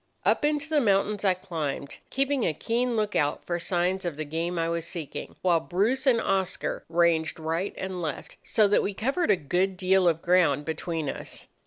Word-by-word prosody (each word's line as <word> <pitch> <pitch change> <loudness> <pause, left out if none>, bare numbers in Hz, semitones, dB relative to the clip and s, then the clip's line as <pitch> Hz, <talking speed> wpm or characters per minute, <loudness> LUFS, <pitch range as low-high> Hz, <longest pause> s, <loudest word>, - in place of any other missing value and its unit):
"Up - - +3
into 295 -1 +1
the 310 -2 +2
mountains 205 -1 +2
I 190 -2 +3
climbed, 155 -6 -4
keeping 275 -1 0
a 155 - 0
keen 240 +5 0
look 210 -2 -1
out 145 -1 0
for 175 -1 -2
signs 180 +2 0
of 170 -5 -3
the 155 - -3
game 165 +4 -2
I 165 0 +1
was 170 0 -2
seeking, 160 -5 -6
while 175 -3 +4
Bruce 215 - 0
and 240 -3 +5
Oscar 195 -2 -1
ranged 165 -1 +2
right 165 +5 -2
and 185 -1 -4
left, 160 -3 -5
so 215 -2 +3
that 205 - +3
we 200 - -2
covered 275 - 0
a - - +6
good 180 +4 0
deal 185 0 +3
of 165 -1 +1
ground 170 -5 +3
between 160 -1 -3
us. - - -5
180 Hz, 195 wpm, -27 LUFS, 165-210 Hz, -, a